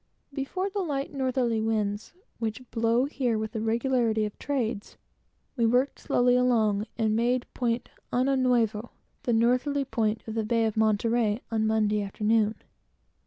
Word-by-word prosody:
Before 290 +8 -2
the 400 +1 -3
light 285 -4 -3
northerly 255 -4 0
winds, 215 -1 -1 0.3
which 225 +2 -3
blow 230 +2 +2
here 255 -5 -1
with 220 0 -3
the 220 -2 -3
regularity 230 -1 +1
of 210 - -6
trades, 235 -7 -3 0.6
we 240 - 0
worked 250 +4 +1
slowly 245 0 +2
along, 225 -4 +2
and 220 -2 +1
made 245 +2 +1
Point 240 -1 -1 0.2
Año 260 +3 +2
Nuevo, 235 -3 +1 0.3
the 245 -4 0
northerly 250 +5 +2
point 225 -4 -1
of 220 - -4
the 225 0 -1
Bay 230 +1 +1
of 220 - -1
Monterey, 220 0 +2
on 220 -1 +1
Monday 215 -1 +2
afternoon. 215 +2 +1
230 Hz, 150 wpm, -27 LUFS, 220-255 Hz, 0.6 s, blow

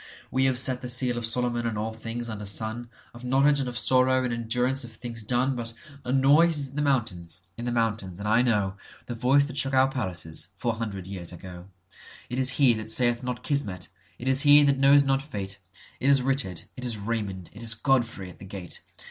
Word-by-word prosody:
We 130 +1 +2
have 130 -1 +2
set 130 0 0
the 125 - -6
seal 125 0 +2
of 120 -1 -2
Solomon 120 0 0
on 110 -2 -3
all 110 +1 -3
things 115 +1 -5
under 105 -2 -6
sun, 110 +4 -1 0.2
Of 120 +1 -12
knowledge 135 +3 +3
and 130 -2 -1
of 120 - -4
sorrow 130 +2 +3
and 125 -2 -1
endurance 125 +3 -1
of 120 - -9
things 115 +1 -6
done. 125 +4 0
But 115 -1 -6 0.3
a 125 - -3
noise 145 +5 +4
is 140 -2 +1
in 135 - -15
the 150 - -1
mountains, 110 - -1
in 120 - -6
the 120 - -1
mountains, 110 -6 -1
and 105 - -4
I 110 +3 +4
knowThe 105 -1 -2
voice 135 +4 +3
that 140 -1 -7
shook 135 -1 +1
our 130 +1 +4
palaces—four 95 -1 -3
hundred 105 -5 -5
years 95 -3 -6
ago:It 90 +6 -11
is 130 0 +5
he 135 -4 +5
that 110 -1 -5
saith 120 +1 +2
not 125 -2 -5
'Kismet'; 105 - -2 0.3
it 125 - -7
is 130 +1 +5
he 145 0 +7
that 140 -1 +2
knows 140 +1 +6
not 135 -1 +1
Fate; 100 -8 -6 0.4
It 135 - +1
is 135 -2 +5
Richard, 135 -10 -1
it 125 - -8
is 120 -3 +1
Raymond, 100 -4 -4
it 105 - -10
is 115 -1 +3
Godfrey 115 -7 0
at - - -18
the 95 - -10
gate! 95 -3 -5
120 Hz, 215 wpm, -26 LUFS, 105-130 Hz, 0.4 s, he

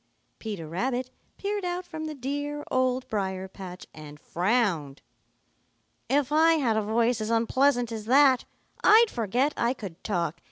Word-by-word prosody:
Peter 200 -8 -6
Rabbit 250 +9 -2 0.3
peered 405 0 -3
out 355 0 -3
from 315 -3 -6
the 310 -1 -5
dear 290 +2 -4
Old 255 0 +1
Briar 190 -3 -3
patch 185 -1 -10
and 150 -1 -11
frowned. 175 - -1 1.1
"If 280 +1 +1
I 320 +2 +5
had 260 -9 +1
a 220 - +2
voice 230 +2 +1
as 215 - -3
unpleasant 240 +2 +2
as 220 -2 -5
that, 265 +1 +5 0.4
I'd 450 +1 +6
forget 245 +6 0
I 235 +2 0
could 185 -7 -9
talk. 170 -5 -2
240 Hz, 150 wpm, -27 LUFS, 195-285 Hz, 1.1 s, I'd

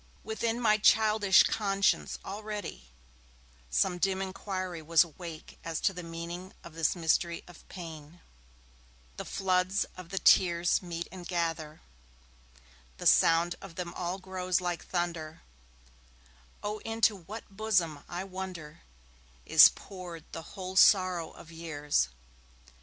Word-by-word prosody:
Within 225 +1 -2
my 215 -3 +3
childish 215 -2 +5
conscience, 195 -2 +1
already, 205 - -6 0.8
some 65 - +1
dim 190 +1 +1
inquiry 185 -2 -4
was 165 +2 +5
awake 165 -1 -10
as 165 -1 -3
to 195 - +2
the 180 - -6
meaning 170 +2 -7
of 170 - -11
this 165 +1 +1
mystery 170 0 0
of 175 -2 -15
pain 165 -2 -9 1.0
The - - -5
floods 185 0 +1
of 185 -2 -10
the 195 - -5
tears 175 -1 +4
meet 170 -2 -5
and 180 -1 -9
gather; 165 -3 -2 1.2
The - - -8
sound 165 +1 +5
of 190 -4 -11
them 175 -1 -5
all 180 +1 -3
grows 185 -1 -1
like 175 -1 -3
thunder; 170 -3 -3 1.2
Oh 210 +1 -3
into 225 0 +1
what 200 +3 -10
bosom, 185 -9 0
I 175 +2 -4
wonder, 185 -5 -7 0.6
Is - - +9
poured 180 -4 -10
the 165 - -6 0.2
whole 185 0 -5
sorrow 185 -4 +5
of 165 - -14
years? 150 - -1
180 Hz, 125 wpm, -30 LUFS, 165-195 Hz, 1.2 s, Is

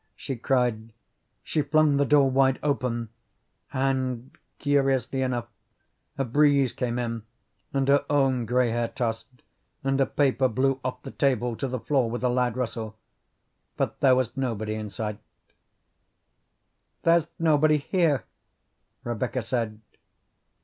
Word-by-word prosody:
she 135 - -5
cried. 120 -3 0 0.5
She 155 - 0
flung 150 0 +3
the 140 - +3
door 145 -1 +5
wide 135 0 +3
open, 125 -5 -1 0.6
and 130 -2 -1 0.3
curiously 135 -2 +1
enough 125 -2 -1 0.7
a 135 - 0
breeze 140 0 +3
came 120 -1 -2
in 115 -2 -2 0.5
and 135 -1 0
her 140 +1 +4
own 135 -5 +2
gray 125 0 +2
hair 120 0 0
tossed, 115 -2 -3 0.6
and 135 0 +1
a 135 - +3
paper 135 -2 +2
blew 130 +2 +1
off 125 0 -4
the - - -7
table 125 -4 0
to 135 - -3
the 130 0 -3
floor 130 -2 +1
with 120 +2 -4
a 125 - +3
loud 125 -1 0
rustle, 110 -3 -4 0.8
but - - -2
there 130 -2 +5
was 125 -2 -1
nobody 115 -5 -2
in 110 -1 -5
sight. 105 +2 -4 1.8
"There's 165 -1 +4
nobody 155 -1 +4
here," 150 - +1 0.8
Rebecca 120 +1 -2
said. 115 -2 -2
130 Hz, 135 wpm, -26 LUFS, 120-140 Hz, 1.8 s, door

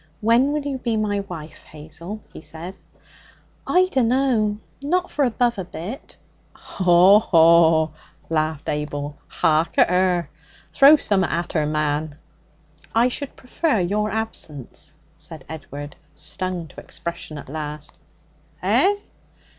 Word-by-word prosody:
'When 235 +6 +3
will 300 -1 -1
you 275 -2 -3
be 235 -2 -1
my 205 -1 0
wife, 165 -6 -8
Hazel?' 160 +7 -9
he - - -9
said. 170 +4 -8 0.9
'I 365 +1 +4
dunno. 245 -4 +2 0.2
Not 360 +6 0
for 290 - +1
above 240 -2 +1
a - - -2
bit.' 185 - -8 0.4
'Haw! 185 +2 +5
haw!' 165 -4 +5 0.4
laughed 155 -2 -1
Abel. 145 -1 -3
'Hark 155 +1 +1
at - - +5
her! 180 -1 +2 0.4
Throw 280 +3 +8
summat 200 - +1
at 170 +2 -3
er', 150 -2 +2
man!' 150 0 -1 0.8
'I 235 +2 +4
should 280 +2 -5
prefer 265 -1 -1
your 205 +4 0
absence,' 155 - -5 0.2
said 160 -1 -10
Edward, 145 -2 -8 0.2
stung 170 +3 -2
to - - -12
expression 170 -2 -6
at 145 - -9
last. 150 +1 -6 0.7
'Eh?' 255 - +4
180 Hz, 125 wpm, -22 LUFS, 155-230 Hz, 0.9 s, Throw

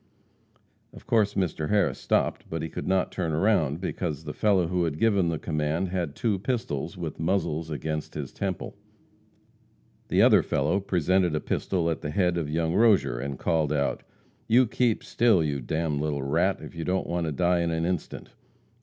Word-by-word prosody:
Of - - -13
course 105 -3 +2
Mr. 85 -5 -1
Harris 105 -1 +2
stopped, - - 0
but 80 -1 -4
could - - -5
not 95 -1 +1
turn 85 -4 -2
round, 80 -4 +2
because 80 -5 -3
the 75 -1 -6
fellow 100 -5 +2
who 90 0 0
had 75 -2 -3
given 100 -3 +2
the 80 - -1
command 75 +4 -1
had 85 -5 -3
two 105 -5 0
pistols, 100 - -3
with 85 -4 -5
muzzles 80 -2 -1
against 75 0 -4
his 70 -4 -5
temple. 95 -3 -4 1.3
The - - +3
other - - +6
fellow 100 - 0
presented 95 -2 +1
a - - +1
pistol 85 +1 -1
at 80 - -1
the 75 - -4
head 90 +2 +1
of 80 -4 -2
young 80 +1 0
Rozier, 100 - +3
and 70 0 -4
called 80 -2 0
out: 70 -2 0 0.5
"You 125 +3 +5
keep 120 -1 0
still, 115 -8 +3
you 70 -2 -1
d - - -12
d 85 +1 0
little 75 -2 -1
rat, 85 +8 +1
if - - -9
you 85 -1 -5
don't 95 +3 0
want 85 -1 -2
to - - -1
die 85 +4 +2
in 85 0 0
an 80 0 -1
instant." 90 -2 -4
85 Hz, 185 wpm, -26 LUFS, 75-95 Hz, 1.3 s, other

